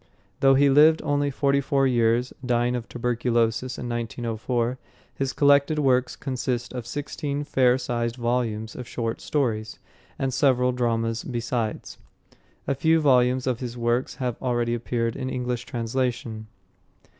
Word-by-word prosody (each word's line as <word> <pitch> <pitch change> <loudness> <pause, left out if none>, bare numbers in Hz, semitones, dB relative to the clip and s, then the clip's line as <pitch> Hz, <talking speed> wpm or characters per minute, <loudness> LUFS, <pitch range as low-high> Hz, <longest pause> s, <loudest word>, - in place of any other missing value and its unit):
Though 135 0 +5
he 140 +1 +5
lived 150 +3 +6
only 145 0 +1
forty 140 0 +1
four 135 0 +1
years, 120 0 +2
dying 120 0 +1
of 120 -2 -5
tuberculosis 120 0 0
in 125 - -5
1904, 120 +1 -2 0.3
his 135 -1 -2
collected 145 +2 +4
works 130 -3 +2
consist 125 -3 -3
of 125 -2 -6
sixteen 145 +1 -4
fair 130 -3 +3
sized 120 -2 -2
volumes 120 -3 -2
of 125 - -7
short 115 -2 -3
stories, 115 -7 -1 0.4
and 135 -1 -1
several 125 -1 +3
dramas 115 -2 -1
besides. 120 -2 -3 0.7
A 140 - +2
few 160 +4 +3
volumes 130 -3 +3
of 125 -3 -1
his 125 -1 -5
works 120 +2 0
have 125 -4 -3
already 120 -2 0
appeared 115 -1 -2
in 130 -1 -4
English 125 -1 -3
translation. 120 -2 -3
125 Hz, 140 wpm, -25 LUFS, 120-135 Hz, 0.7 s, lived